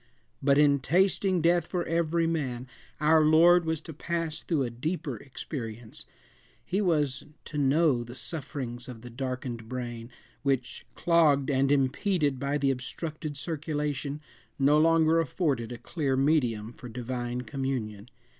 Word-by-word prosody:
But 140 0 +4
in 145 -1 +5
tasting 185 +3 +2
death 170 0 +3
for 175 -2 -2
every 165 0 +1
man 130 -7 -2 0.3
our 155 +1 +5
Lord 170 +3 +6
was 160 -1 0
to 160 - -9
pass 165 0 -3
through 155 -6 0
a 120 - -3
deeper 155 +3 -3
experience; 115 -2 -7 0.6
he 195 +3 0
was 150 -8 +1 0.2
to 150 - -4
know 140 -2 +3
the 120 +1 -10
sufferings 130 -5 -6
of 120 -3 -9
the 120 - -9
darkened 125 -2 -5
brain, 120 -2 -5 0.3
which, 135 -3 -1
clogged 155 -5 +3
and 135 0 +2
impeded 145 +1 +1
by 140 +2 0
the 140 -1 +2
obstructed 150 +3 -5
circulation, 150 -1 -3 0.4
no 145 +1 +4
longer 165 0 +4
afforded 140 -7 -1
a 120 - -5
clear 135 +1 -2
medium 125 -6 +1
for 125 - -10
divine 120 +1 -4
communion. 125 -5 -4
140 Hz, 140 wpm, -28 LUFS, 125-160 Hz, 0.6 s, Lord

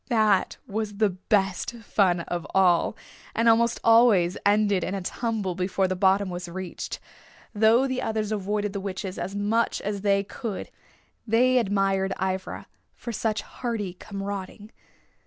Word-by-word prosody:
That 215 -5 +2
was 205 0 -4
the 215 -2 +3
best 195 +2 0
fun 195 -6 +1
of 175 0 -4
all, 185 +2 +3 0.4
and 230 +1 +2
almost 230 +1 +4
always 225 -6 +5
ended 205 -2 +3
in 190 - -2
a 195 - -4
tumble 215 -2 -2
before 185 +1 0
the 185 - -2
bottom 190 +1 +2
was 175 0 -5
reached. 185 0 -6 0.5
Though 225 +5 +4
the 260 -1 -2
others 220 -1 -2
avoided 205 0 -1
the 200 - -3
witches 190 -1 -5
as 195 +2 -4
much 215 +3 +1
as 205 -1 -3
they 200 -1 +2
could 205 0 -6 0.6
they 250 +3 +4
admired 195 -3 +1
Ivra 190 0 -3 0.3
for 235 - -6
such 220 -1 -1
hardy 225 -7 -4
comrading. 200 +2 -7
200 Hz, 145 wpm, -26 LUFS, 190-220 Hz, 0.6 s, always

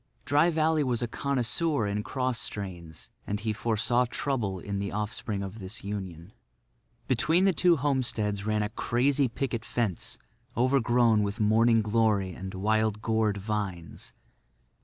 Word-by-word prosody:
Dry 145 +4 +4
Valley 160 -1 +2
was 125 -3 0
a - - 0
connoisseur 140 +2 0
in 100 +1 -1
cross 130 +1 -2
strains; 85 -6 -6 0.2
and 105 0 -2
he 110 0 -1
foresaw 115 +3 +1
trouble 120 -9 -2
in 100 +2 -4
the 100 -1 -3
offspring 105 -1 -3
of 100 +3 -7
this 95 +3 -6
union. 95 -2 -6 0.7
Between 160 +9 +3
the 195 - +4
two 175 +1 +4
homesteads 120 -8 0
ran 105 0 0
a 105 - -2
crazy 130 +5 +1
picket 115 -1 -3
fence 115 -9 -2 0.4
overgrown 120 -3 +3
with 100 +1 -2
morning 110 +1 +4
glory 105 -3 +1
and 95 +2 -7
wild 110 +2 +1
gourd 110 -2 +1
vines. 100 -5 -4
110 Hz, 140 wpm, -28 LUFS, 100-125 Hz, 0.7 s, Dry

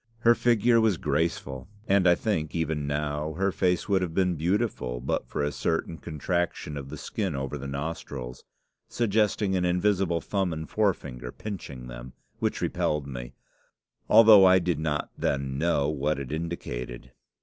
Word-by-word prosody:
Her 120 0 +6
figure 120 0 +3
was 110 -5 +2
graceful, 75 -3 -2 0.2
and 95 -1 +4
I 90 - +6
think, 85 -9 -2
even 80 -3 -1
now, 75 +1 -2
her 95 +4 0
face 90 -1 0
would 95 -2 +2
have 85 -3 -3
been 90 -2 +2
beautiful 85 - -1
but 60 - -2
for - - -2
a 75 - 0
certain 80 +1 -2
contraction 85 -1 -2
of 70 -1 -6
the 75 - -7
skin 95 +1 -3
over 70 +1 -3
the 70 -1 -6
nostrils, 70 -3 -5 0.5
suggesting 105 -3 +1
an 90 - +1
invisible 90 -1 +1
thumb 95 -1 -1
and 80 0 -5
forefinger 70 - -1
pinching 75 -12 -7
them, - - -9 0.3
which - - -1
repelled 75 -2 0
me, 60 -2 -7 0.8
although 110 -3 +9
I 95 0 +7
did 85 -3 0
not 75 -2 -2
then 70 -1 -1
know 75 -3 +2
what 75 0 0
it 70 -1 -6
indicated. 65 -7 -5
80 Hz, 160 wpm, -27 LUFS, 70-95 Hz, 0.8 s, although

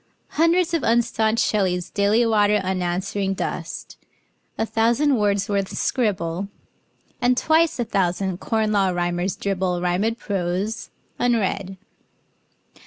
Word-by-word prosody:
Hundreds 335 +2 +2
of 330 - +1
unstaunched 230 -1 +2
Shelleys 185 -4 0
daily 205 +4 +2
water 210 -2 +3
Unanswering 190 +2 -1
dust; - - -5 0.6
a - - 0
thousand 235 +7 +2
Wordsworths 200 -4 0
scribble; 195 -6 -1 0.7
And 245 0 +3
twice 320 +1 +3
a 240 - -1
thousand 190 -2 -1
Corn 220 -1 0
Law 200 -2 +2
Rhymers 175 +1 -1
dribble 185 -2 -1
Rhymed 185 +6 0
prose, 195 +2 -3 0.3
unread. 200 -5 0
205 Hz, 105 wpm, -22 LUFS, 185-230 Hz, 0.7 s, water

